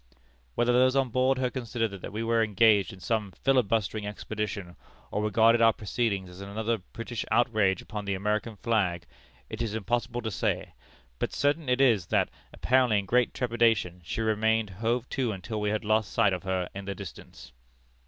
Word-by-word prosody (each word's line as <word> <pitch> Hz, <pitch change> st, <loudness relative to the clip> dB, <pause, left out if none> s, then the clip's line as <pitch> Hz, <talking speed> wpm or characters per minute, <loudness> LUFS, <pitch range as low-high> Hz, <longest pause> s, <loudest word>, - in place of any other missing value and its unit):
Whether 120 Hz, +1 st, +2 dB
those 130 Hz, +1 st, +4 dB
on 135 Hz, -2 st, +2 dB
board 130 Hz, +2 st, +2 dB
her 130 Hz, -1 st, 0 dB
considered 120 Hz, -3 st, -2 dB
that 100 Hz, 0 st, -8 dB
we 110 Hz, +3 st, -3 dB
were 115 Hz, 0 st, +2 dB
engaged 105 Hz, -1 st, +3 dB
in 95 Hz, -, -12 dB
some 105 Hz, 0 st, -2 dB
filibustering 110 Hz, -5 st, +1 dB
expedition, 105 Hz, -3 st, -5 dB, 0.4 s
or 105 Hz, -, -1 dB
regarded 115 Hz, +2 st, +4 dB
our 115 Hz, -1 st, +6 dB
proceedings 105 Hz, -3 st, -2 dB
as 90 Hz, +2 st, -11 dB
another 110 Hz, +3 st, -2 dB
British 115 Hz, +5 st, -6 dB
outrage 110 Hz, -6 st, +2 dB
upon 105 Hz, -1 st, -6 dB
the 100 Hz, -1 st, -1 dB
American 105 Hz, +3 st, -1 dB
flag, 100 Hz, -7 st, 0 dB, 0.4 s
it 110 Hz, +1 st, -6 dB
is 110 Hz, -2 st, -2 dB
impossible 120 Hz, +2 st, -2 dB
to 110 Hz, -, -2 dB
say; -, -, -2 dB, 0.5 s
but -, -, -1 dB
certain 145 Hz, 0 st, 0 dB
it 125 Hz, +1 st, +2 dB
is 115 Hz, -10 st, +4 dB
that, -, -, +2 dB, 0.2 s
apparently 125 Hz, -3 st, +2 dB
in 100 Hz, -, -1 dB
great 125 Hz, +4 st, +2 dB
trepidation, 115 Hz, -7 st, +1 dB
she 80 Hz, -, -3 dB
remained 110 Hz, -1 st, +1 dB
hove 115 Hz, +5 st, -1 dB
to 130 Hz, -4 st, -1 dB
until 105 Hz, +2 st, -5 dB
we 105 Hz, -, 0 dB
had 110 Hz, 0 st, -2 dB
lost 110 Hz, 0 st, +1 dB
sight 105 Hz, -4 st, +3 dB
of 90 Hz, -, -3 dB
her 95 Hz, -2 st, -1 dB
in 100 Hz, 0 st, -7 dB
the 100 Hz, 0 st, -4 dB
distance. 90 Hz, -9 st, -10 dB
110 Hz, 180 wpm, -28 LUFS, 100-120 Hz, 0.5 s, our